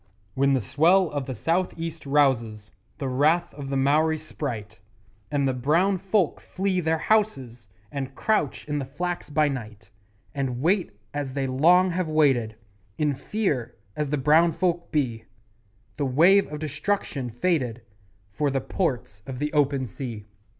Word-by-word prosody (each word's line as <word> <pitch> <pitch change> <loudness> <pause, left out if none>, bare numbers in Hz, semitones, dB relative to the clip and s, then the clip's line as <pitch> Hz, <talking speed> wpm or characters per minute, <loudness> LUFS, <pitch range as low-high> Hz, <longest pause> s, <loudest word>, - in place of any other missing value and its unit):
When 140 +1 +2
the 130 - +2
swell 170 - +3
of 145 -3 -3
the 130 - -4
South 170 - 0
east 165 -2 -6
rouses 120 -7 +1 0.3
The 135 - -3
wrath 150 +7 +2
of 140 -2 -7
the 135 - 0
Maori 155 +4 +3
sprite, 115 -9 -6 0.5
And 140 -2 +1
the 130 - +1
brown 165 +10 +2
folk 195 -2 +1
flee 190 -1 -1
their 160 -1 +1
houses 135 - 0 0.2
And 135 -2 -5
crouch 210 -10 0
in 150 -1 -1
the 135 - -3
flax 175 +7 -4
by 150 0 +2
night, 110 -8 -6 0.4
And 135 -4 -2
wait 170 - +1 0.2
as 145 -2 -3
they 135 -1 -1
long 175 +8 +4
have 180 0 -1
waited 135 -8 +2 0.4
In 150 -2 +1
fear 140 - -2 0.2
as 150 -2 -2
the 150 - 0
brown 160 +5 +4
folk 175 0 -1
be 120 -7 -1 0.7
The 145 - 0
wave 170 +8 +4
of 150 - -4
destruction 150 -3 -2
fated 125 -3 -1 0.5
For 145 +9 0
the 135 0 0
Ports 125 - -3
of 130 -1 -5
the 150 +3 -2
Open 140 -3 +2
Sea. 115 -2 -7
145 Hz, 155 wpm, -25 LUFS, 130-165 Hz, 0.7 s, long